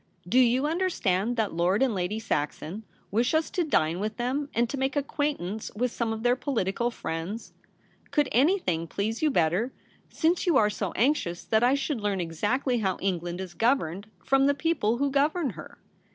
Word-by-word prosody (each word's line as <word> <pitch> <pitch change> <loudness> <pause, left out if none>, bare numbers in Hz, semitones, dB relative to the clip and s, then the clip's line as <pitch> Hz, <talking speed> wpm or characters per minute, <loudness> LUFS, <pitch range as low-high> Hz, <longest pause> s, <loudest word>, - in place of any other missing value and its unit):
Do 245 +8 +4
you 255 +2 +4
understand 245 - 0
that 220 -3 0
Lord 180 +7 +2
and 255 -4 +2
Lady 190 +2 -2
Saxon 170 +1 -3 0.3
wish 235 +8 +2
us 315 0 +1
to 355 - 0
dine 170 - +1
with 215 +2 -3
them, 265 +4 -1
and 235 +1 +1
to 235 - -4
make 265 +2 0
acquaintance 280 - -2
with 245 +2 0
some 235 -2 -2
of 220 0 -4
their 245 0 +4
political 235 -4 -1
friends? 185 0 -5 0.6
Could 295 -3 +2
any 305 +11 +4
thing 165 - -2
please 215 +6 -2
you 310 - +3
better, 180 - +1 0.4
since 340 +3 +1
you 345 - +5
are 210 -1 +4
so 200 -3 -3
anxious 225 - 0
that 220 0 +2
I 255 +3 +4
should 275 -3 -2
learn 205 -2 0
exactly 210 - 0
how 190 -4 0
England 175 -2 -2
is 185 -2 -6
governed 205 - 0
— - - -32
from 270 0 +4
the 285 - +3
people 285 -8 +1
who 280 +1 0
govern 290 +2 +1
her - - -11
230 Hz, 190 wpm, -27 LUFS, 190-275 Hz, 0.6 s, you